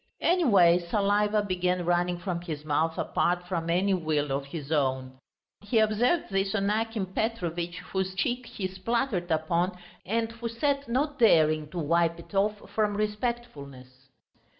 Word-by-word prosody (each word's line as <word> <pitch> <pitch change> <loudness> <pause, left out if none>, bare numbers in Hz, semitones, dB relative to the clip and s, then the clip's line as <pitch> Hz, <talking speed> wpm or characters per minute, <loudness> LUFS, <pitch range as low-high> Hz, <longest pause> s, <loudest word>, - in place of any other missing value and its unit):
Anyway 200 - +5
saliva 205 +3 +1
began 180 -2 -1
running 175 0 +1
from 175 0 -3
his 155 -4 -6
mouth 160 +2 0
apart 175 0 0
from 170 -3 -2
any 185 +4 +2
will 155 -5 0
of 135 +1 -1
his 145 0 -7
own. 130 -3 -1 0.4
He 215 +3 -1
observed 220 +7 +2
this 195 +1 0
on 200 -1 +1
Akim 225 -1 -1
Petrovitch, 175 -4 -3 0.2
whose 190 -1 -1
cheek 245 +5 -1
he 190 - -4
spluttered 190 0 -2
upon 170 +3 0 0.3
and 225 +3 -1
who 230 0 -5
sat 275 +3 -1
not 285 +4 -1
daring 155 -8 +4
to 180 - -8
wipe 170 +1 +1
it 170 - -14
off 205 +1 0
from 210 -2 0
respectfulness. 150 - -5
185 Hz, 150 wpm, -28 LUFS, 165-220 Hz, 0.4 s, Anyway